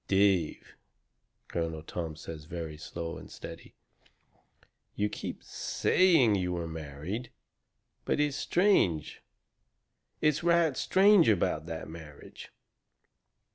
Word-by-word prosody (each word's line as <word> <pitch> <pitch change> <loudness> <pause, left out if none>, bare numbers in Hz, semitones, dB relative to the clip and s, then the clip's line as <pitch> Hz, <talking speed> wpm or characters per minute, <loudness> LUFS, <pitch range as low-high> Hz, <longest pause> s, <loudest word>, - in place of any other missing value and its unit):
"Dave," 95 -5 +1 0.7
Colonel 80 -2 -3
Tom 80 -1 -5
says 80 -1 -9
very 80 -2 -6
slow 80 +2 -6
and - - -12
steady, - - -10 1.2
"you 105 0 0
keep - - -6
SAYING 165 - +3
you 90 -2 0
were 85 -1 -3
married. 80 - -6 0.7
But - - 0
it's 150 -2 +1
strange 145 - +2 1.0
it's 150 0 +2
right 170 -4 +3
STRANGE 195 - +5
about 85 -5 +1
that 80 -1 -5
marriage." 80 -3 -11
90 Hz, 100 wpm, -30 LUFS, -, 1.2 s, STRANGE